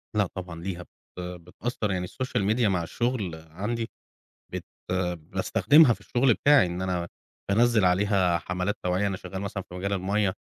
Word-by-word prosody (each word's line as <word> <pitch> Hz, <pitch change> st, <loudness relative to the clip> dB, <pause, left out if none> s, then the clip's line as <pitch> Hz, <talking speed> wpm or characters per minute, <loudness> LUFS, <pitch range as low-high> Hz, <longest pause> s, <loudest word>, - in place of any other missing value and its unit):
لأ 105 Hz, -2 st, +3 dB
طبعًا 90 Hz, -3 st, -6 dB
ليها 90 Hz, 0 st, -4 dB
بت -, -, -25 dB, 0.3 s
بتأثر، 90 Hz, +5 st, -4 dB
يعني 90 Hz, -1 st, -1 dB
الSocial 130 Hz, +1 st, -2 dB
Media 120 Hz, -1 st, +2 dB
مع 90 Hz, -4 st, +1 dB
الشغل 110 Hz, -2 st, -2 dB, 0.2 s
عندي، 115 Hz, +7 st, -3 dB, 0.6 s
بت -, -, -4 dB, 0.5 s
باستخدمها 135 Hz, -, +4 dB
في -, -, -5 dB
الشغل 120 Hz, -1 st, +3 dB
بتاعي، 145 Hz, -5 st, +5 dB
إن 90 Hz, +1 st, -4 dB
أنا 90 Hz, -2 st, -1 dB, 0.4 s
بانزل 115 Hz, 0 st, +4 dB
عليها 90 Hz, -1 st, +3 dB
حملات 90 Hz, +3 st, -2 dB
توعية. 90 Hz, +3 st, +1 dB
أنا 95 Hz, -2 st, -1 dB
شغال 95 Hz, +1 st, -7 dB
مثلًا 100 Hz, -1 st, -4 dB
في -, -, -11 dB
مجال 100 Hz, +2 st, -2 dB
المَيّة، 100 Hz, 0 st, +1 dB
95 Hz, 160 wpm, -27 LUFS, 90-110 Hz, 0.6 s, بتاعي